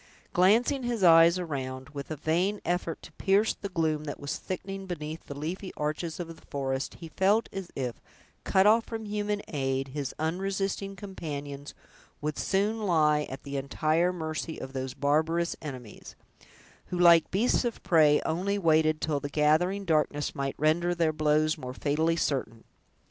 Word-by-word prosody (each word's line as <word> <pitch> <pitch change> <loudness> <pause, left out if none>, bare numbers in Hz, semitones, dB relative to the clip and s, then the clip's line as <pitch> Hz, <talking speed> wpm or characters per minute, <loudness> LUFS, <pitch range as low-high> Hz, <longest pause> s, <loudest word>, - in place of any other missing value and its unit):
Glancing 230 +10 +4
his 240 -4 -2
eyes 165 0 +7
around, 130 -6 -4
with 140 -1 -7
a 155 - -3
vain 175 +7 0
effort 175 -1 -2
to - - -11
pierce 195 +6 +2
the 200 - -7
gloom 160 -4 0
that 145 - -5
was 145 0 -3
thickening 195 +1 -5
beneath 160 -2 -5
the 140 - -7
leafy 180 +6 -4
arches 155 +3 -3
of 165 -1 -6
the - - -19
forest, 135 -1 -3
he 165 -1 -10
felt 200 +7 +2
as 195 -2 -5
if, 125 -3 -4 0.4
cut 190 0 +3
off 225 +2 +5
from 225 -1 -5
human 205 0 -2
aid, 135 -2 -1
his 140 -1 -4
unresisting 195 +4 -2
companions 145 -7 -7 0.4
would 150 0 -2
soon 205 +3 +1
lie 155 -6 +2
at 135 - -8
the 140 0 -4
entire 155 +5 +1
mercy 160 -1 -4
of 130 0 -7
those 130 -1 -4
barbarous 160 +4 +1
enemies, 130 -7 -9 0.7
who, 180 - -4
like 170 -2 +6
beasts 220 +8 +2
of 240 -2 -3
prey, 155 -3 +5
only 185 +5 0
waited 155 -3 +3
till 150 -2 0
the 145 - -5
gathering 160 +7 +2
darkness 150 -3 +1
might 135 0 -3
render 170 +4 +2
their 165 -2 +1
blows 155 +1 +2
more 125 -2 -6
fatally 160 +4 +1
certain. 130 -8 -2
160 Hz, 165 wpm, -28 LUFS, 145-190 Hz, 0.7 s, eyes